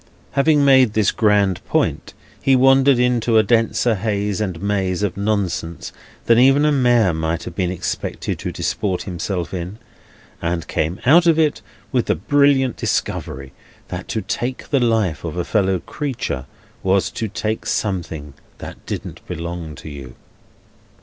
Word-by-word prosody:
Having 145 0 +3
made 130 -5 +5
this 110 -2 +2
grand 105 -4 +2
point, - - -1 0.3
he 135 - +4
wandered 135 +1 +5
into 120 -2 +2
a 110 - +6
denser 115 +2 +2
haze 105 -1 -1
and 95 -5 -3
maze 95 -1 -1
of 100 -3 -1
nonsense 100 -5 -2 0.3
than 115 0 +5
even 135 +3 +5
a 150 - +3
mayor 120 - +3
might 80 +1 -2
have 90 - -7
been 90 0 -1
expected 90 -1 -4
to - - -4
disport 95 -4 -2
himself 90 0 -4
in, 90 +3 -5 0.6
and 85 -1 -2
came 85 +5 -2
out 170 +7 +6
of 165 -2 +4
it 155 -2 +1 0.3
with - - 0
the - - +2
brilliant 135 - +2
discovery 65 0 -3 0.4
that - - -6
to 110 - -2
take 125 +6 -4
the 140 - +3
life 110 - +1
of 85 0 -5
a 90 - -1
fellow 95 -3 +1
creature 125 - -4 0.3
was 95 0 +1
to 110 - -3
take 110 +2 -3
something 80 -8 -3 0.2
that - - -10
didn't - - -6
belong 85 -2 -5
to - - -11
you. 70 -4 -9
105 Hz, 155 wpm, -20 LUFS, 90-125 Hz, 0.6 s, a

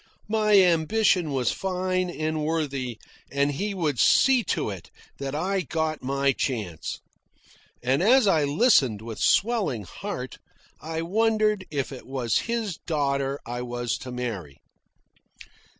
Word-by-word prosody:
My 215 -2 +4
ambition 180 0 +3
was 130 -3 +1
fine 185 -1 -1
and 155 -2 -2
worthy, 140 -7 -2 0.3
and 140 +1 +1
he 200 +8 -3
would 150 -9 -1
see 260 - +5
to - - -1
it 95 -4 -9 0.3
that 140 0 -4
I 190 +5 0
got 160 -1 -2
my 140 +1 +1
chance. 105 - -3 0.8
(And 130 +5 +2
as 245 +5 +5
I 160 -7 +3
listened 140 - +3
with 115 -1 -7
swelling 200 - +2
heart, 90 - -6 0.4
I 160 +1 -4
wondered 215 +1 +1
if 140 -3 -2
it 130 - -9
was 125 -5 0
his 225 -7 -2
daughter 140 -3 -1
I 120 +1 -4
was 120 -2 -2
to 130 - -8
marry.) 105 - -5
150 Hz, 135 wpm, -25 LUFS, 130-190 Hz, 0.8 s, see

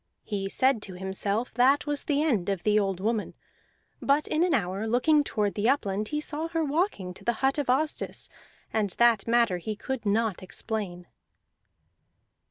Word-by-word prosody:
He 195 -2 -3
said 260 +1 +2
to 190 -3 -7
himself 200 +5 -2
that 260 +5 +4
was 290 -1 -2
the 290 0 +1
end 220 - +1
of 195 -3 -2
the 210 0 +4
old 195 -3 -1
woman; 215 +1 -1 0.7
but 285 +2 +2
in 310 +2 +1
an 360 - +2
hour, 195 +2 -1
looking 290 +6 +3
toward 210 -7 -1
the 215 +3 +1
upland, 210 -6 0
he 300 - -2
saw 305 +1 -3
her 330 -1 -1
walking 290 - -1
to - - -12
the 235 - +1
hut 270 +2 +2
of 285 - -2
Asdis, 295 +4 0 0.5
and 215 -2 +1
that 235 -4 +4
matter 230 -6 +3
he 215 +5 -4
could 265 +3 -4
not 215 -1 0
explain. 185 -2 -4
225 Hz, 175 wpm, -27 LUFS, 200-280 Hz, 0.7 s, that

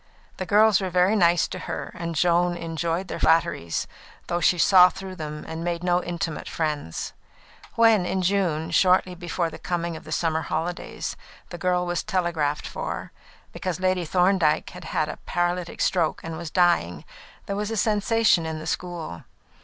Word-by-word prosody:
The 185 - -4
girls 210 -1 +5
were 190 - -2
very 180 +4 +3
nice 175 -4 +4
to - - -6
her, - - -5
and 170 -1 -4
Joan 175 +2 +2
enjoyed 165 +2 -2
their - - -5
flatteries, 155 - +1 0.4
though 175 - -1
she 175 +1 +3
saw 180 +1 +7
through 190 0 -8
them 150 -2 -6
and 160 +1 -5
made 170 0 -2
no 180 0 +2
intimate 170 -2 -4
friends. 150 - -3 0.6
When 225 -4 +5
in 190 -1 -1
June, 175 -5 0
shortly 185 0 +3
before 175 -1 -3
the - - -9
coming 170 -1 -2
of - - -9
the - - -11
summer 160 -1 0
holidays, 165 +3 -4 0.3
the 175 - -8
girl 180 0 +1
was 175 0 -1
telegraphed 170 -7 -1
for, - - -5 0.4
because 185 -3 -4
Lady 185 -1 +1
Thorndyke 180 -2 +2
had 180 -1 -10
had 155 -1 -1
a 150 - -6
paralytic 175 0 -1
stroke 170 -4 +1
and 165 0 -5
was 165 0 -6
dying, 170 - +2 0.4
there 200 - -3
was 210 +1 -2
a 225 - -3
sensation 215 -2 +3
in 160 -1 -4
the 155 - -7
school. 170 - -4
175 Hz, 170 wpm, -25 LUFS, 165-185 Hz, 0.6 s, saw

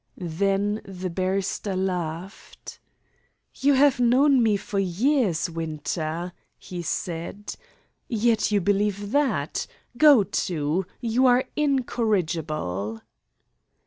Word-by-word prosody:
Then 195 +4 -1
the 185 -1 -6
barrister 190 +2 -2
laughed. 180 0 -5 0.7
"You 285 +1 +2
have 275 -2 +4
known 255 +3 +4
me 215 -3 +3
for 200 0 -3
years, 195 - +1
Winter," 165 +1 -4 0.2
he 180 -1 -7
said, 170 +4 -4 0.5
"yet 225 -1 +1
you 205 -1 +2
believe 205 +1 0
that. 230 - 0 0.3
Go 290 -7 +7
to! 170 0 -1
You 240 +2 +2
are 250 +1 +4
incorrigible!" 165 - -1
195 Hz, 95 wpm, -25 LUFS, 170-235 Hz, 0.7 s, Go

